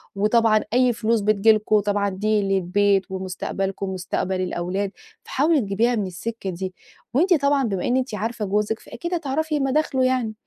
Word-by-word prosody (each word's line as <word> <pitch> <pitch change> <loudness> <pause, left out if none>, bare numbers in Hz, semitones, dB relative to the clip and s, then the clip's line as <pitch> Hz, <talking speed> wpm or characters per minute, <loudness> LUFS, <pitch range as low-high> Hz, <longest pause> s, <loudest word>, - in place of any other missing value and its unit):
وطبعًا 215 +1 +3
أي 250 -1 +4
فلوس 225 -1 0
بتيجي 215 +1 +4
لكم، 215 0 +2
طبعًا 205 0 0
دي 210 +2 0
للبيت، 195 +1 +2
ومستقبلكم، 190 +1 -3
ومستقبل 185 0 -2
الأولاد، 185 +2 -2 0.3
فحاولي 295 +1 +2
تجيبيها 225 +4 +1
من 205 -3 -1
السكة 195 +3 -5
دي. 185 +1 -5 0.4
وأنتِ 350 +8 +4
طبعًا 280 -1 +2
بما 195 -6 -1
إن 250 +1 +2
أنتِ 255 -4 -2
عارفة 220 +1 -3
جوزِك، 210 +3 0
فأكيد 345 +1 -6
هتعرفي 310 -1 -1
مداخله 270 -1 +1
يعني. 255 -4 0
215 Hz, 155 wpm, -23 LUFS, 195-250 Hz, 0.4 s, أي